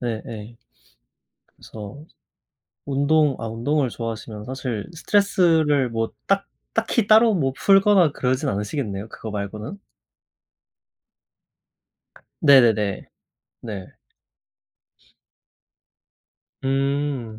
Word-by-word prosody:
네네. 115 -1 -6 1.0
그래서 110 +7 -10 0.8
운동 145 +1 +2
아 115 - -4
운동을 130 +5 0
좋아하시면 110 -2 -6
사실 125 -4 -4
스트레스를 160 -7 +2
뭐 115 0 -2
딱 195 0 +1 0.3
딱히 225 -1 +1
따로 220 0 +6
뭐 135 -7 0
풀거나 195 -4 +5
그러진 130 +1 -1
않으시겠네요, 105 0 -3
그거 110 - -8
말고는? 105 - -5 2.6
네네네. 115 - +4 0.6
네. 100 -5 -7 2.8
음. 135 -4 -1
135 Hz, 180 characters per minute, -23 LUFS, 110-155 Hz, 2.8 s, 따로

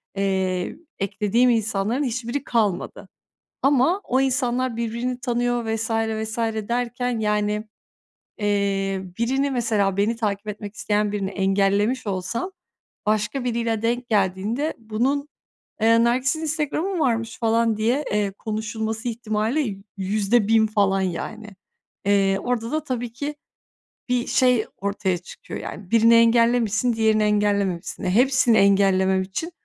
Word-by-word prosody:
eee, 190 -2 -1 0.2
eklediğim 210 +5 +2
insanların 220 +2 0
hiçbiri 255 +1 -3
kalmadı 210 -9 -1 0.5
ama 280 +7 +3
o 260 +2 +1
insanlar 255 -2 0
birbirini 235 +2 -3
tanıyor 245 -1 0
vs. 225 0 -2
vs. 220 0 -1 0.3
derken, 245 0 -1
yani, 210 0 0 0.7
eee, 200 -2 0 0.2
birini, 270 +4 +1
mesela, 215 -6 +1
beni 210 +4 +1
takip 210 -2 -2
etmek 210 0 -6
isteyen 210 0 0
birini 195 -2 -2
engellemiş 200 +4 +1
olsam, 205 - -3 0.6
başka 215 +4 0
biriyle 230 -2 -1
denk 240 +2 -1
geldiğinde 210 - 0
bunun, 245 +6 -1 0.5
eee, 230 +1 +5
"Nergis'in 255 +6 +1
Instagram'ı 310 +3 -1
mı - - -1
varmış?" 230 -5 0
falan 230 -1 +2
diye, 240 +7 +1
eee, 205 -1 +1
konuşulması 220 +2 -4
ihtimali 220 +1 -1 0.2
%1.000 215 +3 +2
falan, 200 -2 +2
yani, 190 +4 -4 0.6
eee, 195 -1 +3
orada 240 -1 -2
da 310 0 -1
tabii 245 -4 -4
ki 290 +4 -4 0.7
bir 250 -1 0
şey 250 -4 +3
ortaya 200 -2 -1
çıkıyor. 175 - -9
Yani, 190 -2 -8
birini 230 0 +6
engellemişsin, 230 0 +3
diğerini 220 -1 +2
engellememişsin. 205 -4 0
E, 180 - 0
hepsini 250 +1 +4
engellemem 190 -1 +4
için 195 - -4
220 Hz, 120 wpm, -23 LUFS, 200-245 Hz, 0.7 s, birini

